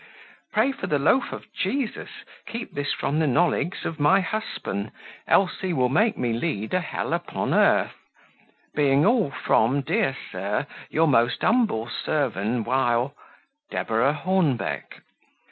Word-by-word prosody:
Prey 220 +6 +2
for 230 -7 -6
the 150 - +1
loaf 160 - +2
of - - -7
Geesus 265 -5 -2 0.4
keep 230 +1 -6
this 145 0 -2
from 150 +3 -1
the 160 - +2
nolegs 170 +4 +1
of 165 - -4
my 165 +7 +5
hussban, 180 - -3 0.4
ells 190 -2 +3
he 185 -2 -1
will 125 -5 +2
make 215 - +2
me 120 -2 0
leed 115 -4 -2
a 185 - +3
hell 170 - -3
upon - - -2
urth. - - +3 0.8
Being 145 0 +3
all 225 - +3
from, 135 0 +2
deer 165 -2 0
Sur, 100 +7 -2 0.2
your 160 +1 +2
most 120 -3 +2
umbell 220 - +2
servan 120 -6 -1
wile 125 +1 +1 0.6
"Deborah 120 +5 +1
Hornbeck." 150 - -1
145 Hz, 140 wpm, -24 LUFS, 120-190 Hz, 0.8 s, my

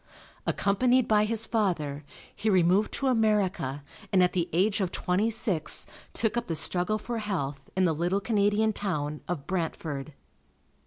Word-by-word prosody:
Accompanied 245 +5 +2
by 210 -1 +4
his 225 0 0
father, 170 -11 -1 0.3
he 220 - -1
removed 185 +2 +3
to 275 - -2
America 205 - +1 0.3
and 185 -2 +5
at 180 - +2
the 175 -2 0
age 200 +5 +2
of 185 -2 -1
twenty 190 +5 0
six 195 -8 +1 0.3
took 220 -1 0
up 240 0 -2
the 165 - -1
struggle 180 +6 +1
for 230 +2 -4
health 140 -10 -4
in 185 - +4
the 165 - +2
little 175 +5 0
Canadian 210 0 +2
town 150 -8 -3
of 160 -6 -4
Brantford. 155 -4 -3
190 Hz, 155 wpm, -28 LUFS, 165-215 Hz, 0.3 s, and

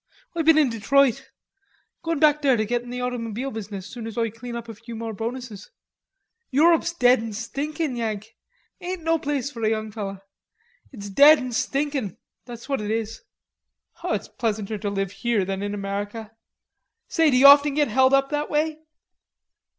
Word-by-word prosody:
"Oi 335 - 0
been 320 0 +5
in 290 -6 +4
Detroit; 255 +3 +2 0.7
goin' 330 -1 -2
back 300 0 +4
there 270 -4 +3
to 215 - 0
git 240 +2 -1
in 245 - -12
the 250 - -5
automoebile 245 +1 -4
business 205 -3 -6
soon 225 +2 -8
as 225 - -8
Oi 230 -2 0
clane 235 +2 -8
up 235 0 -6
a 225 - -7
few 230 +2 -10
more 225 0 -5
bonuses. 225 -1 -6 0.8
Europe's 330 +5 +3
dead 250 -7 +4
an 225 -1 -6
stinkin', 280 +6 -3
Yank. 220 -2 -4 0.4
Ain't 365 -2 -5
no 325 0 +1
place 285 -2 -2
for 235 -4 -9
a 215 - +3
young 215 -1 -2
fellow. 200 -2 -5 0.7
It's 205 -6 -8
dead 290 +9 +8
an 255 -2 -5
stinkin', 275 - -2 0.3
that's 235 -1 -10
what 275 -5 -1
it 210 - -4
is." 225 0 -3 0.8
"It's - - -2
pleasanter 215 -2 -3
to 205 - -2
live 195 -2 -2
here 225 -2 0
than 195 0 -3
in 205 0 -3
America.... 205 +2 -5 0.8
Say, 325 -2 +3
d'you 260 0 +4
often 285 0 +8
get 295 -1 +2
held 260 +3 +4
up 275 +1 +1
that 295 0 -2
way?" 310 +1 0
240 Hz, 175 wpm, -24 LUFS, 215-285 Hz, 0.8 s, dead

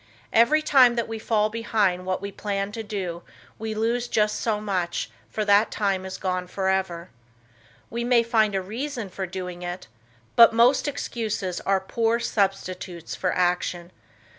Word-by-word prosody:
Every 270 +8 +5
time 255 -5 +6
that 235 -2 -1
we 225 0 -5
fall 215 -1 +1
behind 205 -5 0
what 185 +1 -2
we 200 - -4
planned 200 0 -3
to 225 - -4
do, 190 -5 -4 0.4
we 220 0 -4
lose 235 +2 0
just 210 -2 +1
so 215 -2 0
much 185 -5 -2 0.2
for 215 - -2
that 205 +2 +5
time 195 -3 -1
is 185 - -6
gone 185 -1 -2
forever. 190 -2 -1 0.8
We 235 +1 -2
may 240 -1 +4
find 220 -3 +2
a 190 - -1
reason 235 +2 -4
for 190 +1 -4
doing 180 -1 -6
it, 175 +1 -5 0.5
but 230 -1 +8
most 245 +5 +4
excuses 220 -9 -3
are 195 -1 +3
poor 225 +4 0
substitutes 185 -5 -2
for 180 - -1
action. 175 -1 0
205 Hz, 160 wpm, -25 LUFS, 185-230 Hz, 0.8 s, but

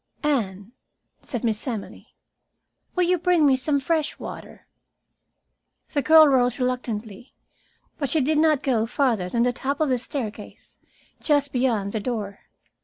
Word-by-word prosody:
"Anne," 210 -8 -1 0.5
said 245 -5 -5
Miss 220 +1 -2
Emily, 225 -5 -7 0.8
"will 360 - +2
you 360 0 +2
bring 345 -2 +3
me 270 -2 +5
some 280 +2 0
fresh 310 +2 -1
water?" - - -9 1.3
The 290 - +1
girl 315 +2 +7
rose 250 -3 +2
reluctantly, 240 -4 -4 0.6
but 280 -3 -1
she 320 - +2
did 300 +3 +1
not 310 -3 +3
go 230 -4 +1
farther 230 -8 0
than 235 +4 +1
the 245 0 +1
top 275 +3 -3
of 310 -2 +1
the 255 -1 +1
staircase, 240 -4 -7 0.4
just 290 -2 +1
beyond 235 -6 0
the 220 - -2
door. 210 -3 -4
255 Hz, 145 wpm, -24 LUFS, 225-295 Hz, 1.3 s, girl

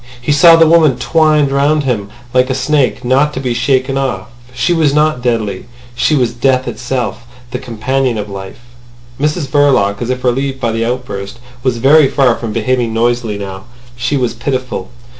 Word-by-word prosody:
He 125 +4 -2
saw 165 +3 +7
the 165 0 +5
woman 155 -5 +4
twined 150 +1 +2
round 145 +2 +2
him 110 -7 -2 0.2
like 130 +1 +2
a 130 - 0
snake, 135 -1 0
not 140 +4 +2
to - - -3
be 125 -2 -2
shaken 130 +2 0
off. 135 -2 -3 0.2
She 130 +7 0
was 155 -4 +2
not 150 -4 +2
deadly. 110 -5 -2 0.3
She 150 +5 +1
was 125 -4 +1
death 130 +1 +1
itself—the 120 0 -5
companion 130 0 -2
of 105 -1 -4
life. 95 +2 -9 0.6
Mrs 150 +2 -1
Verloc, 130 -8 +2
as 120 - -3
if 130 0 -3
relieved 135 +2 -1
by 120 -3 -1
the 115 0 -1
outburst, 115 -4 -5 0.2
was 125 -2 0
very 140 +4 +5
far 130 -3 +2
from 115 -2 -5
behaving 115 +1 -1
noisily 120 -2 0
now. 95 0 -7 0.3
She 130 +4 -1
was 125 -3 -1
pitiful. 125 -5 -4
125 Hz, 175 wpm, -14 LUFS, 120-140 Hz, 0.6 s, saw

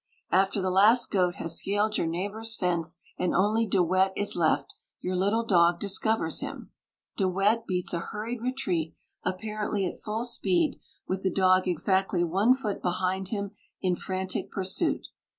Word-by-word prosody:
After 195 +1 +2
the 185 - 0
last 215 +6 +5
goat 180 -3 +2
has 165 0 -2
scaled 205 +2 0
your 165 - 0
neighbour's 205 +7 -2
fence, 175 -2 -1 0.2
and 180 - 0
only 215 +4 +2
De 190 -2 +3
Wet 185 +2 +2
is 205 - +1
left, 155 -5 +1 0.3
your 185 0 -2
little 205 +5 +1
dog 170 -4 +4
discovers 220 +2 +1
him. - - -7 0.5
De 195 - +2
Wet 210 +5 +1
beats 180 -2 -2
a 170 - 0
hurried 220 +6 -5
retreat, 190 - -2 0.3
apparently 210 +1 -2
at 180 - -5
full 215 +2 -3
speed, 185 -9 0 0.3
with 190 0 -2
the 190 - +1
dog 185 0 +3
exactly 185 +1 +1
one 195 +9 +3
foot 220 -7 -4
behind 185 +1 -1
him 200 -1 -3 0.3
in 180 -1 +1
frantic 185 +1 -3
pursuit. 190 -1 -1
190 Hz, 160 wpm, -27 LUFS, 180-210 Hz, 0.5 s, last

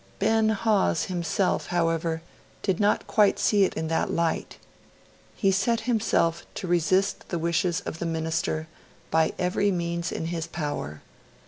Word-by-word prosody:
Ben 220 +1 +3
Hawes 210 -5 +2
himself, 175 +3 0
however, 165 -1 0 0.4
did 190 -3 0
not 205 0 +2
quite 210 -2 +3
see 205 -2 +4
it - - -3
in 160 0 -2
that 165 - 0
light. 165 -1 -1 0.8
He 195 - +2
set 225 +5 +1
himself 205 -8 +1
to - - -4
resist 180 +3 +1
the 175 - -1
wishes 170 +2 0
of 160 - -6
the 170 - -2
Minister 160 -1 -1 0.4
by 160 0 +3
every 185 +3 +1
means 170 -1 -2
in - - -3
his 165 -1 -3
power. 145 - -4
170 Hz, 145 wpm, -26 LUFS, 165-195 Hz, 0.8 s, see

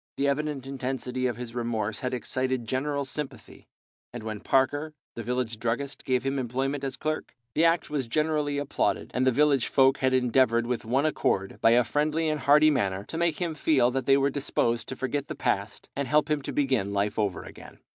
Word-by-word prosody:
The 140 - +1
evident 140 -1 -1
intensity 130 -1 -2
of 120 -3 -3
his 120 -2 -7
remorse 110 -3 -2
had 125 - -2
excited 130 0 -2
general 140 +3 -1
sympathy, 145 +1 -6 0.4
and 120 -2 -7
when 110 -1 -4
Parker, 145 +6 +1 0.2
the 115 - -6
village 120 -1 -2
druggist, 120 +5 -3
gave 130 -3 +1
him 135 0 -1
employment 135 +3 -2
as 135 -1 -2
clerk, 155 0 -3 0.2
the 165 - +3
act 165 -2 +2
was 140 -5 -1
generally 150 +1 0
applauded, 145 -1 -1
and 130 +1 +1
all - - +5
the - - -6
village 145 -3 +3
folk 135 0 +4
had 130 0 +2
endeavoured 125 -2 +3
with 120 -2 -3
one 130 +6 +1
accord, 95 -10 0
by - - +6
a 120 +1 +5
friendly 155 +5 0
and 155 -1 -1
hearty 150 +3 +5
manner, 100 -8 0
to 160 - -6
make 170 -2 +1
him 170 -3 -1
feel 140 -5 +2
that 130 0 -3
they 135 0 +6
were 140 0 +2
disposed 120 -5 0
to 130 - -5
forget 135 +2 -2
the - - -5
past, 100 -4 -2
and 140 -1 -2
help 150 +2 +2
him 150 -1 +1
to - - -5
begin 130 -9 0
life 100 +2 0
over 100 -4 -1
again. - - -12
130 Hz, 205 wpm, -27 LUFS, 120-145 Hz, 0.4 s, by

